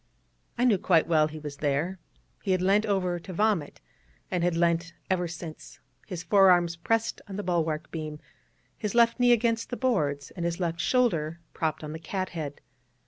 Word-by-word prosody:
I 245 - +2
knew 215 -6 +4
quite 170 -4 +3
well 155 -2 +3
why 155 - -11
he - - -6
was 150 -2 -7
there: 150 +6 -1 0.4
he 195 - +1
had 185 - +1
leant 205 +3 +3
over 185 -3 0
to 185 +2 -9
vomit, 205 -6 0 0.5
and 180 -2 0
had 175 -1 +2
leant 170 0 +1 0.2
ever 180 -2 +1
since, 165 -1 -9 0.3
his 180 -4 -5
forearms 180 -4 +5
pressed 225 +7 -1
on 195 - -7
the 205 - -3
bulwark 165 -3 -1
beam, 155 -2 -5 0.6
his 210 0 -3
left 235 +1 +4
knee 245 0 +5
against 230 -1 +2
the 245 - -4
boards, 150 - 0
and 175 - -6
his 170 +1 -1
left 170 -2 -2
shoulder 170 -12 +1
propped 160 -1 -2
on 150 - -5
the 160 - -6
cathead. 170 -5 -4
175 Hz, 185 wpm, -27 LUFS, 160-205 Hz, 0.6 s, forearms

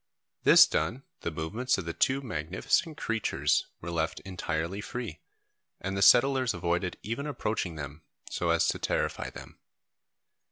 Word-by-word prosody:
This - - +9
done, 85 - -1 0.2
the - - -3
movements 100 +12 -1
of 95 - -4
the 85 - -3
two 135 +8 +2
magnificent 95 - -1
creatures 115 -2 0
were 85 - -5
left 80 0 -1
entirely 90 0 -3
free, 110 -9 -6 0.6
and 95 +1 -3
the 95 - -1
settlers 130 +3 +5
avoided 85 +1 -1
even 115 +7 -3
approaching 110 - -2
them 75 +1 -7 0.3
so 85 - -2
as 85 0 +3
to - - -1
terrify - - -1
them. - - -12
95 Hz, 145 wpm, -29 LUFS, 80-120 Hz, 0.6 s, This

